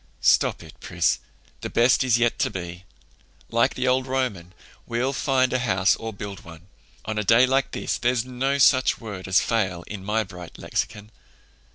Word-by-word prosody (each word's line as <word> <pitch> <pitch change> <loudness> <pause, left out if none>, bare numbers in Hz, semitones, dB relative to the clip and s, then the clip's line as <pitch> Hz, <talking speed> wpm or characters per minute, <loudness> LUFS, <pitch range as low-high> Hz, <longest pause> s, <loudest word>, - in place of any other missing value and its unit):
"Stop - - +2
it, - - -13
Pris. - - 0 0.4
'The - - -5
best 120 +3 +3
is 125 -3 +3
yet 120 -1 +1
to - - +1
be.' 90 0 -7 0.7
Like 115 +3 +2
the 130 0 -1
old 130 +1 +2
Roman, 115 -10 -3 0.3
we'll 120 +3 -1
find 130 -2 +1
a 130 - +1
house 95 -6 +2
or 115 0 -6
build 100 -2 -7
one. 85 0 -13 0.4
On 110 -1 -2
a - - -1
day 115 +5 +5
like 135 +1 +1
this - - -3
there's 125 -1 +1
no 130 +2 -1
such 130 -1 +4
word 100 -5 -7
as 95 +1 +4
fail 95 -7 -1
in 100 0 -8
my 110 +2 0
bright 90 -3 -11
lexicon." 105 +1 -4
115 Hz, 180 wpm, -24 LUFS, 95-130 Hz, 0.7 s, day